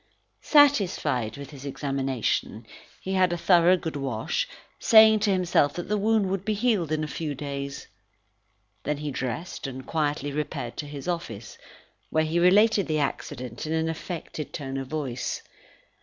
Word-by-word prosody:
Satisfied 200 - +3
with 140 +1 -9
his 140 -2 -11
examination, 135 -3 -2 0.3
he 190 - -4
had 185 -2 +3
a 175 - -1
thorough 175 +1 +5
good 160 -3 -5
wash, 135 - -2 0.3
saying 220 -1 +7
to 205 -1 +2
himself 175 -6 +2
that 175 +1 -5
the 210 - +1
wound 215 -1 +2
would 195 -1 -2
be 215 +1 0
healed 205 -8 +1
in 155 0 0
a - - -2
few 150 -1 -4
days. 140 0 -5 1.0
Then 150 0 -2
he 150 0 -4
dressed, 130 +5 -4
and 130 -1 -7
quietly 145 -2 -1
repaired 140 -4 -4
to 150 - -4
his 145 +1 -8
office, 115 - -5 0.5
where 155 - +2
he 165 +2 0
related 200 +3 +5
the 155 - 0
accident 130 -2 -3
in 155 - -1
an 160 0 0
affected 160 -2 -6
tone 135 -2 -4
of 135 -1 -4
voice. 135 -4 -3
155 Hz, 160 wpm, -26 LUFS, 140-185 Hz, 1.0 s, saying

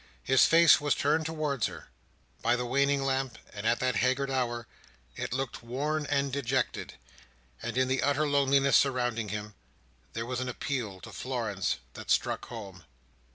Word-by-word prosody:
His 130 0 +5
face 165 -2 +7
was 145 -1 +2
turned 155 +3 +1
towards 150 -6 -1
her. - - -10 0.5
By 120 - +3
the 125 0 -2
waning 140 +2 +2
lamp, 135 -3 -1 0.2
and 105 +1 -3
at 115 - +2
that 130 -3 +1
haggard 130 +3 +1
hour, 120 -3 -1 0.5
it - - -4
looked 130 +1 -3
worn 145 +6 -2
and 140 -2 0
dejected; 130 -2 -1 0.7
and 120 +1 -4
in 130 0 +3
the 130 0 +1
utter 145 +2 +2
loneliness 140 -1 +3
surrounding 120 -5 +2
him, 105 +1 -5 0.6
there 115 +1 -3
was 125 0 -3
an 130 0 -2
appeal 120 -7 -3
to - - -10
Florence 115 -7 -2 0.2
that - - -10
struck - - +1
home. 100 -7 -9
130 Hz, 160 wpm, -29 LUFS, 120-140 Hz, 0.7 s, face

